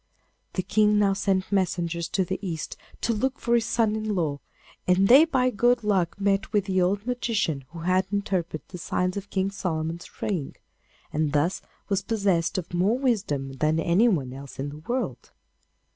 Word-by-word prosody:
The 185 - -1
King 210 +2 +3
now 200 -1 +4
sent 195 -1 0
messengers 170 -3 0
to 190 - +1
the 190 +2 -3
East 170 -6 -4 0.3
to 230 - +1
look 260 +5 -1
for 235 - 0
his 230 -1 +3
son 225 -3 +2
in 215 -1 -2
law, 150 -5 -1 0.5
and 185 +2 +4
they 275 +8 +8
by 255 -6 +1
good 240 +1 +2
luck 195 -3 +1
met 200 +1 +1
with 205 -2 +2
the 190 -2 +1
old 200 +4 +1
magician 220 - -1
who 170 -1 -9
had 185 +2 +2
interpreted 190 -6 -2
the 180 - -8
signs 180 +1 -1
on 200 - -3
King 190 0 0
Solomon's 165 -3 -3
ring, 175 -10 -2 0.6
and 150 -1 0
thus 160 +6 +1 0.3
was 195 -1 +1
possessed 195 -4 0
of 180 -1 -5
more 190 +7 +2
wisdom 195 - -1
than 155 +3 +2
anyone 170 - +2
else 135 0 -10
in 140 +2 -3
the 145 - -9
world. 205 - -3
190 Hz, 175 wpm, -26 LUFS, 170-210 Hz, 0.6 s, they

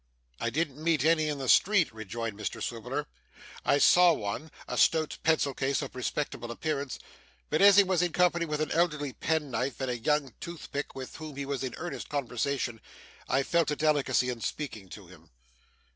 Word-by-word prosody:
'I - - 0
didn't 155 -1 -2
meet 160 -5 +2
many 155 -1 +3
in 150 -1 -2
the 135 -1 -4
street,' 185 - +4
rejoined 110 0 -5
Mr 105 0 -4
Swiveller. - - -3 0.6
'I - - +3
saw 175 +4 +6
one 110 +6 -4 0.2
a - - -3
stout 160 -1 +2
pencil 155 -3 +2
case 135 +2 -1
of 135 - -7
respectable 125 -2 -3
appearance 140 +1 -3 0.5
but - - +2
as 200 0 +8
he 200 - +9
was 185 -3 +1
in 175 -1 +1
company 175 0 +2
with 150 0 -2
an 155 - -1
elderly 150 -5 +1
penknife, 140 -5 -1
and 130 -2 -1
a 120 - -2
young 145 0 0
toothpick 155 -4 -6
with 130 -1 -7
whom 155 -3 -8
he 140 0 -4
was 140 -2 -3
in 130 - -4
earnest 175 +1 -6
conversation, 130 -3 -2 0.5
I 135 - +2
felt 170 +1 +1
a 150 - 0
delicacy 145 -4 +2
in 120 -2 -4
speaking 110 -11 -5
to 100 +1 -10
him. 85 -2 -17
145 Hz, 185 wpm, -29 LUFS, 125-160 Hz, 0.6 s, he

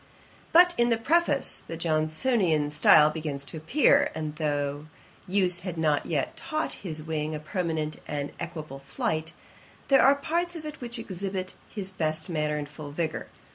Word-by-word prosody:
But, 355 +1 +7
in 240 0 +4
the 230 - +3
Preface, 290 +2 +2
the 165 - -5
Johnsonian 155 - +1
style 150 0 +6
begins 150 -3 -4
to 140 - -8
appear; 285 - +4
and 155 -1 -4
though 145 -1 -2 0.4
use 185 -2 +1
had 180 -2 -6
not 155 -2 +1
yet 150 -5 -1
taught 310 0 -3
his 155 -5 -2
wing 155 -1 -2
a - - -4
permanent 155 -2 -3
and 145 -1 -3
equable 155 -5 -6
flight, 155 +3 -2 0.6
there 275 - +6
are 275 +1 +6
parts 340 +4 -1
of 315 -2 -7
it 300 -2 -7
which 240 0 -4
exhibit 190 -3 -4 0.2
his 195 -3 -6
best 160 0 -2
manner 150 -2 0
in 150 - -3
full 145 0 -9
vigour. 155 +2 -3
160 Hz, 165 wpm, -27 LUFS, 150-225 Hz, 0.6 s, But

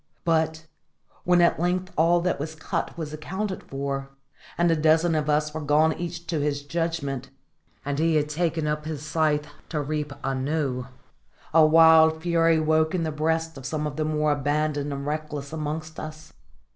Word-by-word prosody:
But, 160 -1 +1 0.6
when 180 0 +4
at 170 - +3
length 180 +2 -1
all 170 +2 +4
that 180 -3 0
was 155 +2 -5
cut 160 - -3
was 155 -2 -5
accounted 190 +6 -4
for, 135 0 -4 0.5
and 175 0 +3
a - - +3
dozen 160 +2 +3
of 155 -1 0
us 150 0 +1
were 160 - -4
gone 150 +2 +3
each 170 0 -6
to 165 -3 -2
his 145 -1 -1
judgment, 145 -4 -3 0.6
and 145 0 -2
he 165 0 +2
had 150 -1 +2
taken 160 +1 -1
up 150 0 -2
his 155 -2 -5
scythe 150 -1 +1 0.2
to 155 - -2
reap 150 0 -3
anew, 135 -1 -1 0.7
a 160 0 +7
wild 160 0 +6
fury 165 -1 +3
woke 155 +1 +2
in 175 - 0
the 160 - -1
breasts 160 +1 -1
of 130 - -11
some 150 +3 -2
of 150 -1 -4
the 155 - -1
more 155 -1 +1
abandoned 145 0 0
and 140 0 -4
reckless 150 -1 -4
amongst 155 +1 -4
us. 155 +1 -9
155 Hz, 175 wpm, -25 LUFS, 150-165 Hz, 0.7 s, a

